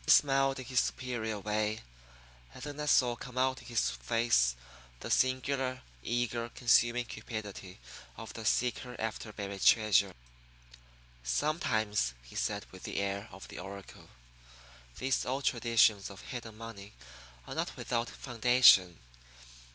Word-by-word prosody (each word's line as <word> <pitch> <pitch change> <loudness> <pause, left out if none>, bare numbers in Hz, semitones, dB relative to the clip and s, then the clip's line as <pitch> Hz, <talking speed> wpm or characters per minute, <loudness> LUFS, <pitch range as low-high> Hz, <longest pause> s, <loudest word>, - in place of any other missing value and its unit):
He - - -6
smiled 135 -1 +5
in 130 - -7
his 130 0 +1
superior 115 -4 -2
way; 105 +1 -1 0.7
and 125 - -9
then 145 0 -6
I 150 - -3
saw 125 -4 +4
come 125 +1 -10
out 130 0 +1
in - - -14
his 115 - +1
face - - +2 0.4
the - - -6
singular, 130 0 +1 0.2
eager, 120 - -1
consuming 120 0 +3
cupidity 105 -5 -7 0.4
of 115 - -8
the 115 - -7
seeker 125 +2 0
after 110 0 -4
buried 100 -1 -6
treasure. 100 -4 +4 1.1
"Sometimes," 105 - 0
he - - -15
said - - -2
with 95 - -12
the - - -5
air 100 +2 -3
of 95 - -11
the - - -8
oracle, 95 +1 -10 0.9
"these 130 0 0
old 135 +2 -2
traditions 115 -4 +3
of 100 - -11
hidden 115 -3 -8
money 110 -2 -9 0.5
are - - -7
not - - -3
without 120 -1 -2
foundation. 120 -7 +5
115 Hz, 135 wpm, -31 LUFS, 100-125 Hz, 1.1 s, smiled